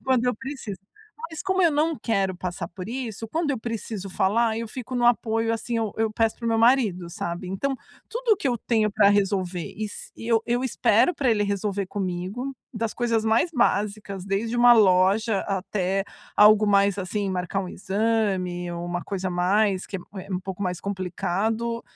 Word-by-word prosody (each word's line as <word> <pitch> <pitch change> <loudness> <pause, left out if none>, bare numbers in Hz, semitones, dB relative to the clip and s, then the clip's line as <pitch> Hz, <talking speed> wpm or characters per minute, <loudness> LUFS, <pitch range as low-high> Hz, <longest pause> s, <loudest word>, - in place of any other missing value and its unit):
quando 255 -2 +2
eu 250 - +2
preciso. 260 -7 -6 0.5
Mas 320 - -6
como 380 0 +1
eu 335 -3 +5
não 310 +1 +1
quero 195 -5 0
passar 180 0 -4
por 185 +4 -8
isso, 230 -4 -4
quando 320 +3 -1
eu 265 - -1
preciso 220 -3 -5
falar, 220 +4 +1
eu 230 0 -4
fico 255 +2 -7
no 245 -1 +1
apoio, 225 -1 +2
assim, 230 +1 -2
eu 220 -3 -1
eu 220 -1 +1
peço 225 0 +1
para 235 - -8
o - - +1
meu 225 - +2
marido, 225 -7 +3
sabe. 170 +2 -4
Então, 195 +10 -1 0.4
tudo 480 -1 +2
o - - -3
que - - -10
eu 245 -2 +2
tenho 215 -2 +1
pra 210 -1 +4
resolver 190 -4 0
e 215 - -4
s 205 - -8
eu 225 -1 +1
eu 245 +2 0
espero 235 - +3
pra 265 -3 +1
ele 210 -2 +2
resolver 200 -1 -1
comigo. 195 +7 -4 0.2
Das 220 0 -1
coisas 230 -2 0
mais 225 +10 +2
básicas, 205 - 0
desde 215 +5 -1
uma 240 0 +8
loja 200 +1 +4
até 195 0 -1 0.3
algo 210 0 +7
mais, 200 -1 +3
assim, 195 +1 -2
marcar 180 +1 -2
um 185 - -6
exame 190 -4 -1
ou 170 0 -5
uma 175 0 -3
coisa 190 -1 -3
mais, 190 +2 +1
que 195 - -6
é - - -4 0.3
é 195 - -6
um 180 - 0
pouco 190 +1 -6
mais 180 -2 -2
complicado, 200 +5 -2
210 Hz, 190 wpm, -25 LUFS, 190-235 Hz, 0.5 s, uma